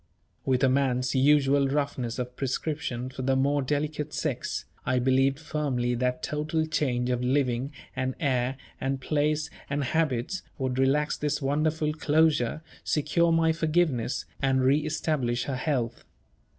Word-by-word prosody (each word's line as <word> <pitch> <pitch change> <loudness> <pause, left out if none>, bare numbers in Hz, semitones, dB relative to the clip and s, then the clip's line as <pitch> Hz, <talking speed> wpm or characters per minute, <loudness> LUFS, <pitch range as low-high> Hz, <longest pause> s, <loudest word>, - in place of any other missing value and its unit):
With 130 -1 +2
a - - +6
man's 130 -1 +1
usual 140 0 +4
roughness 135 -4 -1
of 125 0 -4
prescription 130 -2 -3
for 130 - -6
the 135 +1 +2
more 140 +2 +2
delicate 150 +2 -2
sex, - - -2 0.2
I 130 - +1
believed 135 +2 +3
firmly 140 -6 -1
that 125 +1 -1
total 155 +1 -1
change 125 -6 0
of 125 -1 0
living, 130 0 +1 0.2
and 130 0 -1
air, 130 -4 0 0.2
and 135 0 -1
place, 150 +2 0 0.2
and 140 0 0
habits, 155 +3 0 0.2
would 130 -2 -1
relax 145 +3 +2
this 150 -1 -1
wonderful 150 +2 0
closure, 155 -2 +2 0.2
secure 165 +3 +2
my 165 0 +4
forgiveness, 160 -6 0 0.2
and 135 -1 +2
re 135 +3 +4
establish 150 -6 -1
her 135 - -3
health. 125 -4 -2
140 Hz, 140 wpm, -27 LUFS, 130-150 Hz, 0.2 s, a